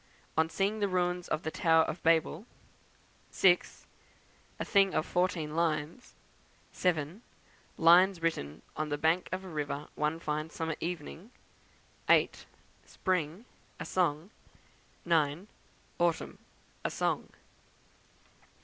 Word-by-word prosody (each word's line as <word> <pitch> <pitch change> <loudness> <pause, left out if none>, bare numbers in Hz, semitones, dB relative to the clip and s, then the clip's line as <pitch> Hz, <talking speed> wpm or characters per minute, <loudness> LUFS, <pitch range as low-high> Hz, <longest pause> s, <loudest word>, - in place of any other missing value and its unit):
On 160 0 +2
Seeing 200 +5 0
the 205 - +1
Ruins 180 -1 0
of 155 - -2
the 160 - -3
Tower 160 -3 +4
of 160 +2 -4
Babel; 165 +5 +2 0.8
6. 180 -2 +2 0.7
A - - -2
Thing 195 -2 +3
of 155 - +1
14 170 -4 -1
lines; 160 +6 -2 0.6
7. 170 +2 -1 0.6
Lines 175 +3 +6
written 80 - -2
on 155 0 -2
the 145 - -1
Bank 160 +4 +1
of 185 +1 -3
a - - -8
River 150 -3 -4
one 150 +2 -1
fine 155 0 -3
Summer 160 -1 -3
Evening; 170 +3 -5 0.8
8. - - +3 0.4
Spring, 180 +2 -2 0.3
a - - -5
Song; 175 0 0 0.7
9. 165 +2 +1 0.5
Autumn, 170 -1 0 0.4
a - - 0
Song. - - -1
165 Hz, 115 wpm, -31 LUFS, 155-185 Hz, 0.8 s, Lines